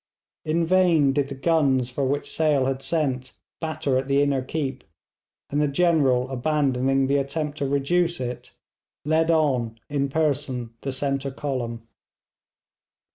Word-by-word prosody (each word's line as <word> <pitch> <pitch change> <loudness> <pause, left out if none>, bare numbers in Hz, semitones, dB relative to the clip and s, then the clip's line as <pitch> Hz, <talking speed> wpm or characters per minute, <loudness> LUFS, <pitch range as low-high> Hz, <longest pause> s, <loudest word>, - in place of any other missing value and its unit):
In 165 +2 +1
vain 165 -6 +4
did 140 -1 +1
the 140 - -6
guns 135 -4 +2
for 140 +2 -2
which 145 +2 -1
Sale 150 -4 +2
had 135 0 -1
sent 135 -3 -1 0.3
batter 155 -5 -1
at 135 - -5
the 140 0 +2
inner 140 -2 +1
keep, 135 -1 -4 0.7
and 145 +1 +1
the 150 - +3
General 140 -5 +2
abandoning 135 -1 +1
the 140 +1 +2
attempt 145 +2 -3
to 140 - 0
reduce 170 +5 +1
it, 125 -1 -5 0.6
led 160 +2 +2
on 130 -8 +1
in 140 -1 0
person 135 -6 -1
the 135 - -3
centre 135 +1 -1
column. 125 -5 -4
140 Hz, 140 wpm, -24 LUFS, 130-155 Hz, 0.7 s, vain